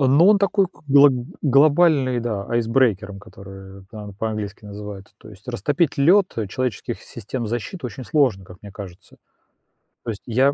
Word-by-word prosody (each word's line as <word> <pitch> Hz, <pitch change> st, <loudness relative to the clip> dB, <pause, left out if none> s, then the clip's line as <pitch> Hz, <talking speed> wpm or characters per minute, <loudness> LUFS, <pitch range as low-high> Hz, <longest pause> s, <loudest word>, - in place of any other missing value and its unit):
Ну, 140 Hz, +6 st, +5 dB
он 210 Hz, 0 st, +6 dB
такой 195 Hz, 0 st, +2 dB
к 175 Hz, -, -23 dB
гл 140 Hz, +1 st, +7 dB, 0.3 s
глобальный, 145 Hz, -2 st, +4 dB
да, 110 Hz, -4 st, -3 dB
айсбрейкером, 115 Hz, -4 st, 0 dB
который 95 Hz, -2 st, -13 dB
там 105 Hz, -2 st, -9 dB
по-английски 105 Hz, -1 st, -5 dB
называется. 100 Hz, -1 st, -9 dB
То 110 Hz, -, -15 dB
есть 105 Hz, +3 st, -16 dB
растопить 140 Hz, +6 st, -1 dB
лед, 180 Hz, +7 st, +4 dB
э, 110 Hz, -3 st, -2 dB
человеческих 125 Hz, 0 st, -4 dB
систем 120 Hz, +2 st, -6 dB
защиты 120 Hz, -, -4 dB
очень 120 Hz, +3 st, -8 dB
сложно, 125 Hz, -11 st, +1 dB
как 90 Hz, 0 st, -14 dB
мне 100 Hz, -1 st, -11 dB
кажется. 95 Hz, -4 st, -11 dB, 0.9 s
То -, -, -6 dB
есть 100 Hz, -, -8 dB
я, 130 Hz, +4 st, +2 dB
115 Hz, 160 wpm, -21 LUFS, 100-140 Hz, 0.9 s, гл